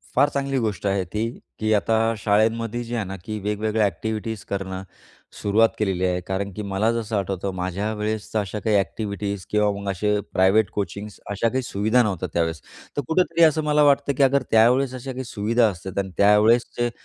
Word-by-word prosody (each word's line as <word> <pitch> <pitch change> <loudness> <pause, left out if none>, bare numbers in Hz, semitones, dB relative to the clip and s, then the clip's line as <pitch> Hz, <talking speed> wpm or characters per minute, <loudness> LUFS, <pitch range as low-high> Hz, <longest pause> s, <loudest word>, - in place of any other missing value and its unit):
फार 145 +3 +5
चांगली 140 -1 -1
गोष्ट 105 -4 -2
आहे 95 -1 +1
ती 105 +1 0 0.4
की 110 0 +1
आता 105 +2 +2 0.2
शाळेंमध्ये 115 +3 +1
जे 120 +1 -5
आहे 105 -4 -1
ना 95 +1 -6
की 110 -1 -4
वेगवेगळ्या 105 +1 0
एक्टिविटीज 110 +1 -4
करणं 95 -1 -4 0.6
सुरुवात 110 +2 +4
केलेली 95 -3 0
आहे. 90 0 0
कारण 100 +1 -2
की 105 - -5
मला 100 +3 0
जसं 115 -2 -3
आठवतं 95 0 -2
माझ्या 95 +4 -2
वेळेस 105 0 -3
तर 110 - +2
अशा 105 +1 -3
काही 105 0 +1
एक्टिविटीज 100 0 -2
किंवा 105 -1 +2
मग 100 -1 -4
असे 105 +2 0
प्रायवेट 95 +3 +4
कोचिंग्स 105 +1 -5
अशा 110 +3 +1
काही 130 +2 -1
सुविधा 110 +4 +2
नव्हत्या 100 -5 -2
त्यावेळेस. 80 -2 -1 0.4
तर - - +2
कुठेतरी 170 0 +2
असं 155 -1 +4
मला 150 0 +3
वाटतं 140 0 +3
की 140 - +4
अगर 140 0 +4
त्यावेळेस 125 +4 +4
अशा 130 +1 -6
काही 130 +1 -5
सुविधा 115 +1 +1
असतात 95 +1 -8
आणि 95 -1 -2
त्यावेळेस 105 +4 +5
जे 120 0 +2
105 Hz, 190 wpm, -23 LUFS, 100-115 Hz, 0.6 s, फार